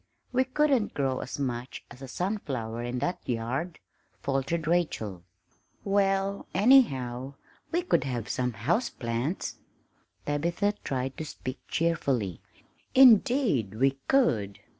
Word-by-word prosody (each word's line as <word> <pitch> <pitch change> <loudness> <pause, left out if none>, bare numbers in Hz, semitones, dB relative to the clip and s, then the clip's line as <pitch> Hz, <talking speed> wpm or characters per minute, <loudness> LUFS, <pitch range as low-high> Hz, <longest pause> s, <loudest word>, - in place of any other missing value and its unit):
"We 260 +1 +2
couldn't 265 -4 +1
grow 135 -2 0
as 125 - -5
much 125 -2 -4
as 125 - -12
a 135 - -7
sunflower 130 - -3
in 120 +1 -3
that 175 +8 -1
yard," 125 +9 -2 0.4
faltered 140 +4 -1
Rachel. 150 - 0 0.6
"Well, 195 0 +1
anyhow, 135 - +3 0.4
we 345 +2 +1
could 360 - +2
have 120 -4 -3
some 125 -1 -1
houseplants!" 120 - -2 0.7
Tabitha 170 +8 0
tried 130 0 -3
to 155 - -4
speak 130 -3 -6
cheerfully. 135 - 0 0.5
"Indeed 235 - +5
we 135 +3 +2
could!" 115 - +2
140 Hz, 115 wpm, -28 LUFS, 125-195 Hz, 0.7 s, Indeed